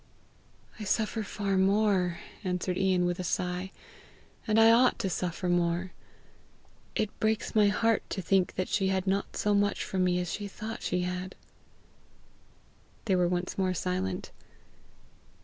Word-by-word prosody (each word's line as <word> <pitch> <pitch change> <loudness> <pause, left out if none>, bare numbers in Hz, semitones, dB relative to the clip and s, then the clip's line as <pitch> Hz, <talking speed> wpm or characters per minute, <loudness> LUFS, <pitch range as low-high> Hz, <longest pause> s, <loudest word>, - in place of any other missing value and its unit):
"I - - -5
suffer 220 +2 0
far 200 -2 -2
more," 190 -3 +2 0.3
answered 180 -1 -1
Ian 185 -1 +2
with 175 0 -1
a - - -2
sigh; 180 +2 -2 0.8
"and 215 0 +3
I 225 0 +8
ought 245 +2 +5
to 190 - -2
suffer 180 +1 -2
more. 175 +1 +1 1.0
It 215 - -2
breaks 220 0 0
my 210 -2 +5
heart 225 +2 +2
to - - -3
think 185 0 +2
she 195 0 0
had 190 -1 0
not 195 +1 -1
so 210 - +1
much 205 0 +1
from 185 -1 -1
me 180 -1 +2
as 180 -1 -3
she 205 -1 -4
thought 220 +3 -7
she 180 +1 -1
had." 180 +1 -4 1.7
They 195 -4 +2
were 180 -1 +3
once 180 +2 -2
more 185 -1 +1
silent. 95 - -2
190 Hz, 150 wpm, -29 LUFS, 180-205 Hz, 1.7 s, I